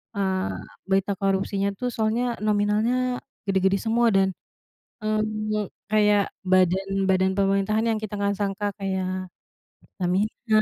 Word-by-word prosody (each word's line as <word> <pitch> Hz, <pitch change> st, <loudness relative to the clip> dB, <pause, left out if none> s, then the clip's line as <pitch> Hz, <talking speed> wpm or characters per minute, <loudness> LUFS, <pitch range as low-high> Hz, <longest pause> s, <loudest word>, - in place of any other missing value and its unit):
eee, 190 Hz, -1 st, 0 dB, 0.4 s
berita 195 Hz, +1 st, +2 dB
korupsinya 195 Hz, 0 st, 0 dB
tuh 250 Hz, +4 st, -2 dB
soalnya 230 Hz, +2 st, 0 dB
nominalnya 215 Hz, +5 st, +1 dB, 0.3 s
gede-gede 190 Hz, 0 st, +2 dB
semua. 235 Hz, +1 st, +2 dB
Dan, 190 Hz, 0 st, +4 dB, 0.8 s
eee, 215 Hz, -1 st, -1 dB, 0.2 s
kayak, 210 Hz, -1 st, +4 dB, 0.2 s
badan 185 Hz, +1 st, +3 dB, 0.2 s
badan 190 Hz, 0 st, +3 dB
pemerintahan 195 Hz, +3 st, +2 dB
yang -, -, -2 dB
kita 210 Hz, -1 st, -5 dB
nggak 200 Hz, 0 st, 0 dB
sangka 205 Hz, 0 st, -1 dB
kayak 185 Hz, -1 st, -2 dB, 0.5 s
Pertamina, 215 Hz, +4 st, 0 dB
200 Hz, 115 wpm, -25 LUFS, 190-215 Hz, 0.8 s, Dan